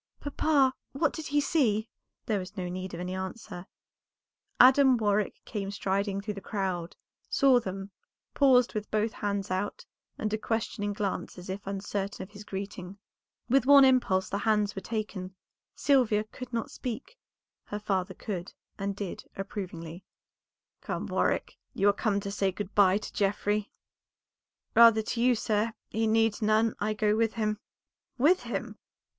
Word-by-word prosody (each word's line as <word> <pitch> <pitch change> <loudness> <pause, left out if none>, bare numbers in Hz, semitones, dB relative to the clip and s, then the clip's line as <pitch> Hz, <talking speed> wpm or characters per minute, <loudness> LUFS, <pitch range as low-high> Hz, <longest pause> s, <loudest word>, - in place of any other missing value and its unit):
"Papa, 285 -2 +2 0.2
what 295 +2 +1
did 315 -2 -6
he 290 +1 +2
see?" 230 -8 +1 0.4
There 210 -3 0
was 185 +3 -8
no 180 -1 -2
need 185 0 -5
of - - -7
any 180 +1 -4
answer; 190 -1 -6 0.9
Adam 260 0 +7
Warwick 210 -2 +1
came 200 -3 -4
striding 200 0 -1
through 210 +1 -4
the 200 - -8
crowd, 185 -4 -3 0.3
saw 265 -3 +5
them, 195 -2 -6 0.4
paused 255 -3 +4
with 215 -2 -4
both 215 +1 +1
hands 200 -2 -2
out, 190 +2 -2 0.3
and 215 0 -2
a 215 - 0
questioning 220 -2 -2
glance 200 -2 -3
as 180 +1 -7
if 195 +1 -7
uncertain 195 0 -3
of 190 - -12
his 205 0 -10
greeting. 195 -1 -6 0.5
With 260 +1 +3
one 280 -1 +9
impulse 245 -8 +3
the 200 - -2
hands 210 -1 +1
were 195 - -5
taken; 205 -4 -4 0.4
Sylvia 245 -7 +3
could 245 +3 -10
not 230 -2 -3
speak, 255 - -6 0.5
her 205 - -4
father 195 -3 -2
could, 185 -4 -5 0.3
and 200 0 -2
did 200 -2 -6
approvingly 180 -3 -6 0.9
"Welcome, - - -2
Warwick; - - 0 0.2
you 200 - +2
are - - +4
come 205 -1 0
to 200 - -4
say 195 -1 +1
good 205 +1 -6
by 195 -1 +5
to 210 - -7
Geoffrey?" 205 +1 0 1.0
"Rather 230 -1 +7
to 230 +2 -2
you, 250 0 +4
sir; 215 0 0 0.2
he 225 +1 0
needs 225 0 +2
none, 215 +1 +3
I 215 +1 -1
go 210 0 +2
with 225 0 +1
him." 215 -2 -1 0.6
"With 300 +7 +4
him!" 235 -2 -5
210 Hz, 160 wpm, -29 LUFS, 195-230 Hz, 1.0 s, one